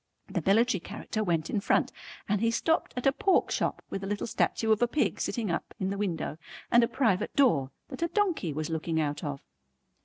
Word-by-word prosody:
The - - -3
military 220 +1 +4
character 215 +3 -4
went 165 -4 0
in 210 - -1
front - - +2 0.4
and 210 0 +1
he 230 - +3
stopped 320 +8 0
at 250 - -3
a 270 - +6
pork 375 +6 +2
shop - - -1
with 195 - -4
a - - -3
little 205 0 -2
statue 225 -1 0
of 215 - +3
a 240 - +4
pig 285 +4 0
sitting 220 -7 -1
up, 170 - -4
in 190 0 -1
the 200 - -3
window, 165 -6 -2 0.3
and 240 0 +6
a - - +3
private 225 -9 0
door 165 - +3 0.2
that - - -8
a 335 - +2
donkey 350 - 0
was 155 +2 -3
looking 160 0 -1
out 145 -1 -1
of. 145 -2 -4
205 Hz, 215 wpm, -29 LUFS, 165-240 Hz, 0.4 s, a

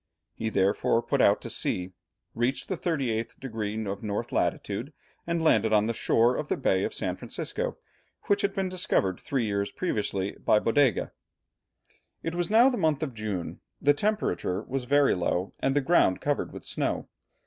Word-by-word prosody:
He 110 - -3
therefore 100 +3 +2
put - - +1
out - - +4
to - - -6
sea, 90 0 -1 0.4
reached 120 +4 -1
the 190 - 0
38 130 -10 -2
degrees 110 -4 -3
of 100 0 -4
north 105 -2 -3
latitude, - - -1 0.3
and 170 -1 0
landed 110 -8 +3
on 105 0 +4
the 115 - 0
shore 115 +2 +2
of 150 - -3
the - - -1
Bay 95 -8 +1
of - - -1
San - - -1
Francisco, - - -4 0.5
which 200 0 +2
had 200 - +1
been 195 -1 0
discovered 175 - 0
three 130 -4 -1
years 100 -1 -1
previously 100 - -1
by - - +5
Bodega. 115 +1 +2 1.1
It 165 - -2
was 175 -1 -1
now 230 +4 +6
the 255 -2 +1
month 155 -3 +1
of 140 -5 -3
June, 105 -6 -4 0.2
the 145 - +4
temperature 145 - -1
was 130 -1 -3
very 145 +2 +4
low, 90 +1 -1
and 135 +1 +1
the 145 - +3
ground 135 - +3
covered 145 -1 -1
with - - -9
snow. - - -2
120 Hz, 175 wpm, -27 LUFS, 105-155 Hz, 1.1 s, now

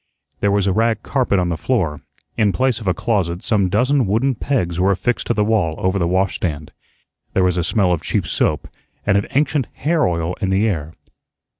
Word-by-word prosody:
There 100 - +1
was 100 -1 +2
a 95 - +2
rag 115 +1 +1
carpet 130 -7 +1
on 90 -1 +1
the 85 - -2
floor. 85 - -1 0.3
In 105 -3 +2
place 130 -2 +1
of 110 - -7
a 90 - +3
closet 90 -6 -1
some 100 -4 +1
dozen 125 +4 +2
wooden 115 +7 +1
pegs 100 -9 -1
were 95 +2 +3
affixed 100 +6 -1
to 120 - +1
the 105 - +2
wall 105 -7 +1
over 95 +1 0
the 85 - +1
washstand. 85 -5 -1 0.6
There 95 - +2
was 90 -1 +2
a 90 - 0
smell 95 -1 +1
of 85 - 0
cheap - - -1
soap - - 0 0.4
and 100 - +2
of 100 - +1
ancient 145 -1 +1
hair 155 +2 +1
oil 85 0 -1
in 95 - 0
the 95 +3 +2
air. 80 -6 -3
100 Hz, 205 wpm, -19 LUFS, 90-115 Hz, 0.6 s, a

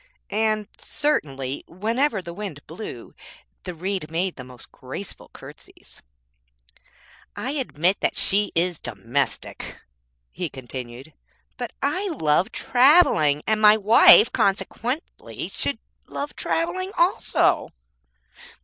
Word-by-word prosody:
And 215 0 0
certainly, 140 - -2
whenever 220 - -1
the 170 - -7
wind 180 -7 -7
blew, 160 - -9 0.5
the - - -6
Reed 185 -1 -3
made 175 +3 -2
the 130 - -9
most 125 -1 -15
graceful 130 +10 -9
curtsies. - - -13 1.3
I 260 - -3
admit 200 - 0
that - - 0
she 205 +1 +3
is 175 0 +2
domestic,' 115 +7 -3 0.5
he 175 -2 -4
continued, 130 +2 -9 0.4
'but 245 -2 -6
I 370 +9 0
love 165 - +1
travelling, 245 - +4
and 215 0 +1
my 210 0 +7
wife, 220 +2 +7
consequently, 235 - -2
should 280 - -2 0.3
love 290 +1 -5
travelling 370 +3 -2
also.' 350 +3 +2
195 Hz, 105 wpm, -23 LUFS, 150-250 Hz, 1.3 s, my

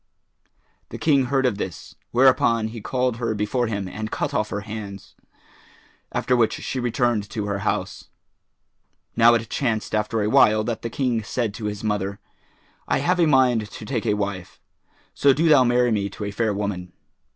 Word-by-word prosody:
The - - -7
King 145 -4 +3
heard 135 +1 +1
of 110 -5 0
this; 80 -6 -6 0.2
whereupon 120 -3 +3
he 115 0 -8
called 125 0 -1
her 115 -2 -2
before 105 +4 -1
him 100 -3 -3
and 110 +3 -5
cut 145 +4 -3
off 105 -5 0
her 105 - -3
hands, 105 -1 -8 1.0
after 125 - +1
which 115 -3 +2
she 130 - -4
returned 120 -3 0
to 105 -1 -4
her 100 -1 -2
house. - - -3 1.1
Now 120 +1 +6
it 115 -1 -2
chanced 115 -6 -1
after 110 +1 0
a - - 0
while 110 0 +4
that 115 0 -3
the 115 - -4
King 120 -2 -1
said 110 -1 -2
to 110 - -7
his 105 +1 -4
mother, 100 -2 -2 0.7
"I - - +2
have 180 +6 +1
a 170 - +4
mind 125 -6 +3
to 110 - -9
take 115 -3 -3
a 105 - +2
wife; 100 -3 -4 0.5
so 140 -1 +4
do 160 +5 +1
thou 150 -5 +6
marry 120 0 +2
me 100 -2 0
to 100 - -8
a 100 - -3
fair 110 +1 0
woman." 100 -3 -4
110 Hz, 185 wpm, -23 LUFS, 105-125 Hz, 1.1 s, Now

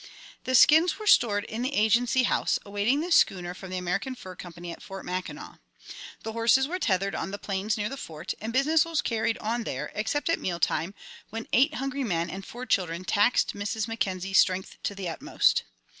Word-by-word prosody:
The 260 - +1
skins 315 +5 +6
were 430 - -7
stored 215 - +4
in 220 +2 -5
the 265 +3 -2
Agency 235 +4 +3
House, - - +1
awaiting 205 +8 +1
the 350 +2 -4
schooner 180 - +3
from 190 +1 -10
the 185 - -3
American 185 +9 -2
Fur 185 -6 -10
Company 175 0 -8
at - - -10
Fort 195 0 -8
Mackinac. 180 0 -6 0.6
The 225 - -4
horses 230 +4 +3
were 365 +4 -3
tethered 195 - 0
on - - -3
the 200 - -5
plains 205 +2 -2
near 210 0 -1
the 275 +4 -6
Fort, 155 - -6
and 220 +2 -4
business 290 +5 +3
was 330 -1 -1
carried 225 0 0
on 230 +2 -2
there, - - -4
except 220 +8 -1
at - - +1
meal 175 -2 -3
time, 175 +3 0 0.3
when 225 +1 -6
eight 280 +5 +4
hungry 275 +1 -2
men 170 -6 -1
and 195 +1 -6
four 245 +5 -8
children 185 -5 0
taxed 205 +6 +2
Mrs. 205 +2 -3
Mackenzie's 195 -4 0
strength 185 0 +1
to 200 - -3
the 195 -2 -5
utmost. 165 - +1
215 Hz, 200 wpm, -27 LUFS, 185-255 Hz, 0.6 s, skins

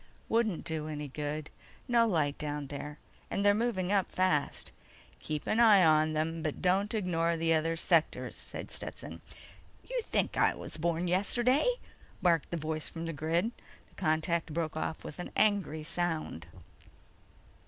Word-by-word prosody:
"Wouldn't 225 -6 +1
do 160 -2 -3
any 150 -1 -4
good. 150 +2 -4 0.4
No 235 -1 +4
light 155 -8 +1
down 150 -1 -3
there, 145 +1 -6 0.3
and 200 - -1
they're 205 - +7
moving 205 -4 0
up 200 -2 +2
fast." 185 -6 0 0.5
"Keep 150 -2 -4
an 220 - +1
eye 210 -6 +7
on 155 0 +4
them, 160 +1 -1
but 155 -2 -3
don't 195 +4 +2
ignore 170 -4 +1
the 165 0 +2
other 165 +1 +1
sectors," 165 -1 +1
said - - -6
Stetson. - - -5 0.7
"You - - -1
think - - 0
I - - +4
was - - -4
born 170 +2 0
yesterday?" 240 - +3 0.5
barked 170 -5 +2
the 170 - -2
voice 155 0 -3
from 165 0 -6
the 165 - -3
grid. 165 +8 0 0.4
The - - -26
contact 160 +1 0
broke 160 -2 -1
off 160 0 -3
with 150 - -8
an 180 - -5
angry 195 -7 +2
sound. 160 - -2
165 Hz, 155 wpm, -31 LUFS, 155-195 Hz, 0.7 s, they're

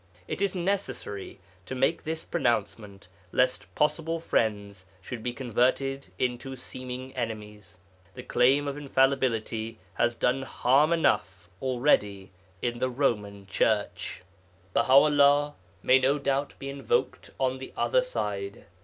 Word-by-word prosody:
It - - -4
is 200 -1 +1
necessary 175 - -3 0.3
to 130 - -4
make 135 +6 +1
this 160 +1 -3
pronouncement, 105 - -2 0.2
lest 125 0 0
possible 160 +2 +1
friends 100 - -1
should 115 +5 -7
be 125 - -2
converted 130 +2 0
into 125 +1 -2
seeming 130 +1 -7
enemies. 105 -6 -6 0.4
The 125 - -8
claim 130 +4 +3
of 140 0 -3
infallibility 130 -5 0 0.2
has 120 +3 +1
done 125 +3 +1
harm 135 +3 +3
enough 95 - +1
already 120 -7 +1 0.3
in 120 -1 -1
the 130 - +1
Roman 105 -7 -1
Church! 105 -1 -1 0.5
Baha - - +2
'ullah 145 +1 +6 0.3
may 130 +1 +6
no 135 +3 +2
doubt 140 0 -1
be 135 - -7
invoked 140 -1 -1
on 130 0 0
the 130 - -8
other - - +3
side. - - -4
130 Hz, 125 wpm, -28 LUFS, 110-140 Hz, 0.5 s, ullah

